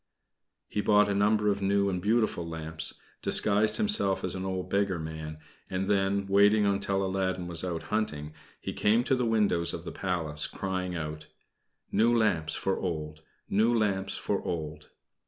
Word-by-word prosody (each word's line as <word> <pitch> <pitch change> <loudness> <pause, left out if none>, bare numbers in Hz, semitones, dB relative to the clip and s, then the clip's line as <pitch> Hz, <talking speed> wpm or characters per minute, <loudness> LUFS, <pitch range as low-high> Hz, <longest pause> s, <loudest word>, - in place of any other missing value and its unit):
He 105 - -2
bought 105 0 +4
a - - +1
number 105 +1 +2
of 100 -1 +1
new 100 0 +2
and 90 -2 -2
beautiful 110 -3 +1
lamps, 80 0 -5 0.3
disguised 105 +1 +4
himself 205 - +4
as 90 - -3
an 95 0 -5
old 95 -1 -3
beggar 100 -1 0
man, 80 -1 -6 0.3
and 95 +1 -2
then, 100 0 +1
waiting 100 +2 +4
until 100 -1 0
Aladdin 95 -1 -2
was 85 -1 -1
out 85 -3 -3
hunting, 75 -9 -2 0.3
he - - -5
came 110 +3 +2
to 135 - +1
the 125 -2 -1
windows 100 -7 +2
of 85 - -8
the - - -6
Palace, 80 -5 -2
crying 95 -2 -4
out: 75 -1 -6 0.6
"New 115 +3 +3
lamps 90 -8 0
for 95 -1 -1
old; 75 -3 -4 0.3
new 110 +4 +2
lamps 100 -4 0
for - - -2
old." 75 -2 -5
95 Hz, 165 wpm, -28 LUFS, 85-105 Hz, 0.6 s, bought